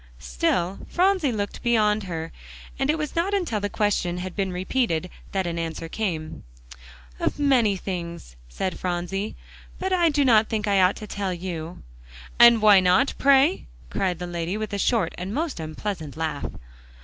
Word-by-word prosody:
Still 75 - -1
Phronsie 365 -6 +2
looked 205 -3 -4
beyond 215 -3 +2
her, 165 -2 -5 0.5
and 270 +1 0
it 310 - +2
was 300 -2 -4
not 370 +5 +1
until 340 - -1
the 205 0 -2
question 200 -5 0
had 180 0 -5
been 195 -2 -1
repeated, 180 -2 -1 0.2
that 190 -2 -1
an 170 -1 -3
answer 165 0 -4
came. 165 -5 -4 0.8
"Of - - -1
many 250 -9 +3
things," 170 - -6
said 180 - -3
Phronsie, 180 +3 -3 0.4
"but 380 0 -2
I 345 -2 +4
do 290 -2 +2
not 220 -3 +5
think 215 -1 -1
I 200 -2 +4
ought 185 +1 +4
to 215 - -8
tell 195 -3 -3
you." 170 -1 -6 0.6
"And 235 -2 +8
why 205 -2 +8
not, 185 +8 +3
pray?" 280 +4 +4 0.2
cried 185 -3 0
the 180 - -5
lady, 175 +2 -3
with 215 -1 -4
a 200 - -1
short 210 -6 +1
and 190 +5 -4
most 315 - -2
unpleasant 160 -1 -5
laugh. 160 -3 -2
195 Hz, 170 wpm, -24 LUFS, 175-235 Hz, 0.8 s, And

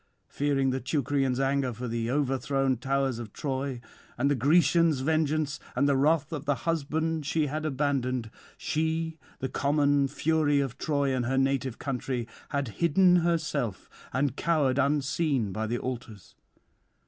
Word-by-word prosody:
Fearing 140 -2 +1
the 130 - -1
Teucrians' 135 -1 0
anger 135 -1 +1
for 125 +3 -5
the 115 0 -2
overthrown 135 0 +1
towers 135 -1 0
of 115 -3 -8
Troy, 135 -2 -3 0.4
and 140 +4 +2
the - - +3
Grecians' 160 +2 +3
vengeance 155 0 0 0.2
and 140 +3 +3
the 140 - +3
wrath 155 +3 +2
of 150 -2 -5
the 145 - +2
husband 160 0 -1
she 155 0 +1
had 155 +2 -2
abandoned, 130 -5 -1 0.3
she, 160 +1 -1 0.2
the 130 - -3
common 140 +1 +2
Fury 150 0 +1
of 135 -4 -3
Troy 140 -3 0
and 125 -2 -1
her 130 +1 0
native 135 -2 0
country, 125 -3 -3 0.2
had 140 -4 -1
hidden 180 +2 +5
herself 155 - -1 0.2
and 130 0 0
cowered 145 -6 +1
unseen 140 - +1
by 110 +3 -2
the 120 +2 -1
altars. 115 -6 -6
140 Hz, 150 wpm, -28 LUFS, 130-155 Hz, 0.4 s, hidden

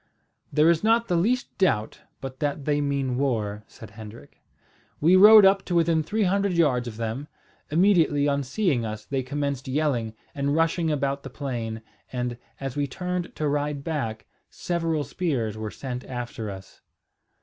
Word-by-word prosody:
"There 150 +1 +4
is 165 +2 0
not 230 +1 +3
the 175 - +2
least 235 +9 0
doubt 110 - +1 0.2
but 130 -1 -7
that 145 -2 -2
they 145 -1 +1
mean 140 -3 -1
war," 105 -6 -1
said 110 -2 -13
Hendrik. 105 -8 -12 0.6
"We 170 +5 +5
rode 210 +2 +9
up 195 0 +4
to 175 - -2
within 165 -1 +3
three 210 +7 -1
hundred 200 0 +1
yards 135 -8 +2
of 110 -2 -7
them. 115 +5 -4 0.4
Immediately 160 -4 +3
on 140 0 +1
seeing 140 - 0
us 110 -1 -5
they 135 -1 -1
commenced 140 0 -3
yelling, 130 -6 -1 0.2
and 140 0 0
rushing 165 +1 +1
about 140 -2 -1
the 135 - -8
plain; 120 -5 -4 0.3
and, 125 -1 -3 0.2
as 135 -2 -5
we 145 -1 0
turned 180 +4 -4
to 155 - -1
ride 145 0 -1
back, 135 -9 -3 0.2
several 165 -3 -1
spears 130 - -2
were 110 0 -4
sent 125 +2 -6
after 120 -3 -5
us." 95 -1 -10
140 Hz, 165 wpm, -25 LUFS, 120-165 Hz, 0.6 s, rode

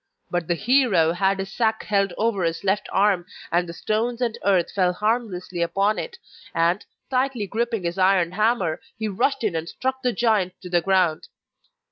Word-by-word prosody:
But 175 -2 -1
the 175 - +1
hero 215 -7 +3
had 190 +3 +1
his 195 0 -5
sack 220 -2 0
held 200 -2 +1
over 215 -4 0
his 165 0 -1
left 195 +1 0
arm 195 -2 +3 0.3
and 175 0 +1
the - - -6
stones 225 +6 -1
and 240 -3 0
earth 190 -4 +2
fell 180 -2 +2
harmlessly 210 -4 -2
upon 195 +5 +1
it, 475 -1 -6 0.4
and, 170 +4 +2 0.3
tightly 255 -4 0
gripping 225 0 -2
his 170 +2 -3
iron 185 -2 +3
hammer, 200 -5 +1 0.2
he 220 -1 -2
rushed 245 +6 0
in 205 -6 0
and 165 +1 -3
struck 260 0 -3
the 250 -1 +1
giant 215 -6 +1
to 180 - -8
the 175 -1 +3
ground. 185 -4 +1
195 Hz, 180 wpm, -23 LUFS, 175-225 Hz, 0.4 s, hero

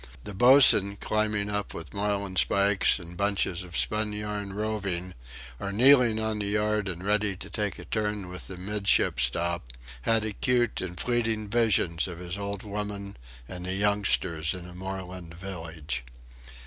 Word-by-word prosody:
The 105 - -7
boatswain, 120 -3 +7
climbing 105 0 -1
up 105 -2 -3
with 85 -1 -8
marlinspikes 100 -1 +2
and 85 -2 -11
bunches 100 -2 0
of 90 -2 -8
spunyarn 105 -1 -1
rovings, 100 -4 -3 0.5
or 100 - -4
kneeling 120 0 +5
on 110 -1 -1
the 100 - -2
yard 105 0 0
and 90 0 -5
ready 105 -1 +1
to - - -10
take 105 -3 -2
a - - -10
turn 105 -3 -2
with 90 0 -8
the 95 - -8
midship 100 -3 +1
stop, 75 +1 +1 0.3
had 110 - +1
acute 120 +3 0
and 90 -1 -5
fleeting 115 -3 0
visions 100 -8 +2
of 90 -2 -7
his 90 +1 -5
old 100 0 -5
woman 100 -1 -5 0.3
and 90 0 -7
the 90 - -1
youngsters 95 -5 +1
in 90 -1 -8
a 90 - -11
moorland 90 -2 -7
village. 80 -7 -6
100 Hz, 150 wpm, -27 LUFS, 90-105 Hz, 0.5 s, boatswain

